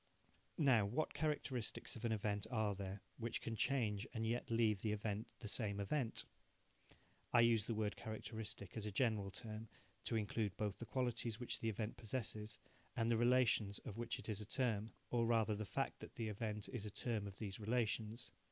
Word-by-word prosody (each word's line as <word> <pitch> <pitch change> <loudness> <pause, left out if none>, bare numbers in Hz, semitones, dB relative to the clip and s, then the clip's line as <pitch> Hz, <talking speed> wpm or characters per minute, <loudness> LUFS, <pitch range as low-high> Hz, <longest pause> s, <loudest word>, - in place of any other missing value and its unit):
Now 130 - +6
what 120 +10 0
characteristics 145 -6 -1
of 115 0 -4
an 115 - +2
event 105 -2 0
are 110 -4 +2
there 100 0 -5 0.2
which 115 0 -1
can 115 - -3
change 110 -3 +2
and 110 0 0
yet 120 +2 0
leave 110 -4 +3
the 105 -1 +1
event 105 0 -2
the 110 - -4
same 105 -2 +1
event? 115 +4 +1 1.1
(I 120 - +7
use 115 -3 +5
the 115 - -1
word 105 -1 0
characteristic 110 -3 -5
as 110 -2 -2
a - - -2
general 105 -3 +2
term 110 +2 -6 0.4
to - - 0
include 105 -2 0
both 105 -2 -1
the 120 - -5
qualities 120 -3 0
which 120 - -2
the 115 - 0
event 110 0 -2
possesses, 110 -2 -3 0.4
and 115 +1 +2
the 115 - +4
relations 120 -4 +4
of 110 - -5
which 120 0 -1
it - - -8
is 110 -2 -1
a - - -5
term 115 -4 +1 0.2
or 115 -1 +3
rather 115 -2 +4
the 105 +1 -2
fact - - -1
that - - -9
the 115 -2 -1
event 105 0 -2
is 125 -6 -3
a 105 - -3
term 105 0 -1
of 95 -1 -8
these 100 -1 -4
relations.) 110 0 0
110 Hz, 190 wpm, -41 LUFS, 105-120 Hz, 1.1 s, I